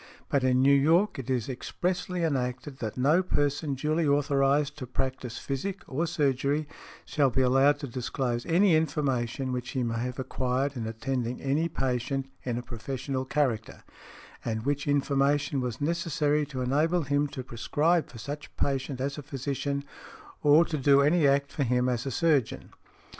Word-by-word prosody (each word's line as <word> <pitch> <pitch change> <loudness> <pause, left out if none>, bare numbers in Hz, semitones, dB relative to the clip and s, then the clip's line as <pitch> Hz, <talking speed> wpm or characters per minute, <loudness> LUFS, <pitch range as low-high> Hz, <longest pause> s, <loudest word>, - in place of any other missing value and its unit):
But 140 -2 +1
in 130 0 +3
New 140 +1 +6
York 165 +7 +3
it 130 -1 -6
is 125 -4 0
expressly 175 +6 -2
enacted 130 -2 -2
that 110 0 -4
"no 150 +8 +4
person 145 -4 0
duly 155 +4 0
authorized 140 0 +2
to 130 - -6
practise 130 -1 -3
physic, 185 +9 -4
or 160 +6 -2
surgery, 145 -2 0 0.4
shall 140 -3 +2
be 130 +1 +1
allowed 135 +3 +4
to 140 - -4
disclose 125 0 -2
any 175 +1 +4
information 135 -5 0
which 125 -1 -3
he 130 -3 -1
may 115 -1 -1
have 125 +1 -3
acquired 130 +1 -1
in 115 -3 -3
attending 120 +2 -3
any 145 +5 0
|95| - - -25
patient 135 +1 -1
in 120 -2 -3
a 120 - -4
professional 130 +2 -4
character, 130 -6 -1 0.6
and 110 -1 -2
which 145 0 -1
information 145 0 +1
was 125 -2 -3
necessary 150 -2 0
to 135 -3 -5
enable 155 +7 +2
him 145 +1 +1
to 140 -2 -7
prescribe 150 +8 +1
for 120 - -11
such 145 +6 -7
patient 135 -1 -1
as 140 +3 -2
a - - -5
physician, 140 0 -3 0.6
or 150 +3 +6
to 155 -3 -3
do 140 +1 +5
any 150 +1 +4
act 140 0 +2
for - - -4
him 125 0 +1
as 125 +1 -1
a - - -2
surgeon". 150 -4 +1
140 Hz, 170 wpm, -28 LUFS, 125-150 Hz, 0.6 s, New